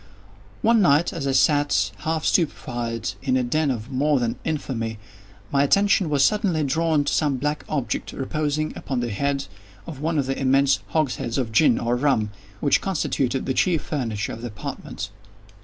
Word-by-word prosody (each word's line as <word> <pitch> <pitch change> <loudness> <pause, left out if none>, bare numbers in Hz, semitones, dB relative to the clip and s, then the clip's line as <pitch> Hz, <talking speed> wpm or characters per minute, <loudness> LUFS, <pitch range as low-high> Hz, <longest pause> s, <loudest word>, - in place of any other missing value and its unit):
One 230 -1 +5
night 165 -2 +3
as 150 -5 -3
I - - +2
sat, 130 -8 +3
half 160 +8 -2
stupefied, 120 -8 -1
in 130 -1 +1
a 130 - +1
den 150 +5 +1
of 120 0 -3
more 140 +2 +2
than 115 -1 -2
infamy, 115 -8 -3 0.5
my 140 - +3
attention 200 +2 +3
was 140 -3 +4
suddenly 200 -7 +1
drawn 155 +1 +1
to 145 - -1
some 145 -4 +1
black 150 +3 -2
object, 140 -5 -2
reposing 150 +2 -2
upon 130 -4 -3
the 120 -1 -2
head 140 +6 -1 0.4
of 150 -5 -8
one 160 +2 -1
of 140 - +1
the 135 +1 -2
immense 135 0 +3
hogsheads 135 -6 -1
of 125 -4 -1
gin, 120 +1 +4
or 120 +1 0
of 125 - -1
rum, 110 -8 +2 0.3
which 145 - +3
constituted 135 -8 -1
the 130 - 0
chief 165 +3 +1
furniture 115 -9 -3
of 115 - -8
the 120 - -4
apartment. 105 -3 -6
140 Hz, 175 wpm, -23 LUFS, 125-155 Hz, 0.5 s, One